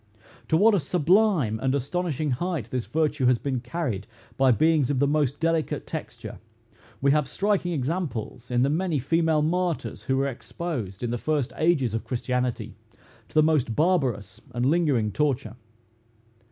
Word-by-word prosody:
To 160 Hz, -, +3 dB
what 215 Hz, +5 st, +5 dB
a 200 Hz, -, +3 dB
sublime 170 Hz, -, +2 dB
and 130 Hz, +1 st, +1 dB
astonishing 150 Hz, +1 st, -2 dB
height 145 Hz, -, -2 dB
this 125 Hz, -2 st, -2 dB
virtue 150 Hz, -4 st, +1 dB
has 125 Hz, -1 st, +4 dB
been 130 Hz, 0 st, -2 dB
carried 125 Hz, -, -4 dB, 0.3 s
by 135 Hz, 0 st, +3 dB
beings 155 Hz, +1 st, +3 dB
of 145 Hz, -, 0 dB
the 140 Hz, -, +3 dB
most 145 Hz, -1 st, 0 dB
delicate 165 Hz, -1 st, 0 dB
texture, -, -, -7 dB, 0.6 s
we 140 Hz, +1 st, +4 dB
have 150 Hz, -2 st, +2 dB
striking 200 Hz, -3 st, 0 dB
examples 135 Hz, -, -3 dB
in 125 Hz, 0 st, +2 dB
the 135 Hz, -, +2 dB
many 170 Hz, 0 st, 0 dB
female 160 Hz, +3 st, +1 dB
martyrs 175 Hz, +1 st, -2 dB
who 130 Hz, -, +1 dB
were 135 Hz, -, +1 dB
exposed, 125 Hz, -, -5 dB
in 120 Hz, -, -1 dB
the 120 Hz, -, -2 dB
first 150 Hz, -3 st, -1 dB
ages 155 Hz, -9 st, +2 dB
of 115 Hz, -, -2 dB
christianity, 125 Hz, -1 st, -2 dB, 0.5 s
to -, -, -24 dB
the 155 Hz, -, +6 dB
most 150 Hz, -8 st, +1 dB
barbarous 125 Hz, -, 0 dB
and 120 Hz, +1 st, 0 dB
lingering 140 Hz, -8 st, +2 dB
torture. 125 Hz, -4 st, -1 dB
145 Hz, 160 wpm, -25 LUFS, 125-165 Hz, 0.6 s, the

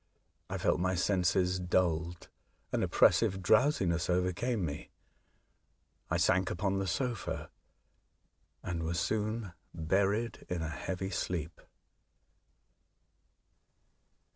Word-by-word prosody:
I -, -, -2 dB
felt -, -, +1 dB
my 95 Hz, +1 st, +1 dB
senses 90 Hz, 0 st, +2 dB
dulled, 85 Hz, -2 st, 0 dB, 0.4 s
an -, -, 0 dB
oppressive 95 Hz, 0 st, +3 dB
drowsi 130 Hz, +2 st, +4 dB
ness 85 Hz, 0 st, 0 dB
overcame 90 Hz, +4 st, 0 dB
me, 70 Hz, -2 st, -5 dB, 1.2 s
I -, -, +1 dB
sank 95 Hz, -1 st, +3 dB
upon 95 Hz, +2 st, -1 dB
the 95 Hz, -, -2 dB
sofa, 120 Hz, +6 st, -2 dB, 1.1 s
and 85 Hz, -1 st, -3 dB
was 85 Hz, +1 st, -1 dB
soon 110 Hz, 0 st, -1 dB, 0.2 s
buried 100 Hz, +7 st, 0 dB
in 85 Hz, -2 st, -2 dB
a 80 Hz, -, -2 dB
heavy 95 Hz, +4 st, -4 dB
sleep. 85 Hz, -2 st, -3 dB
90 Hz, 100 wpm, -32 LUFS, 85-100 Hz, 1.2 s, drowsi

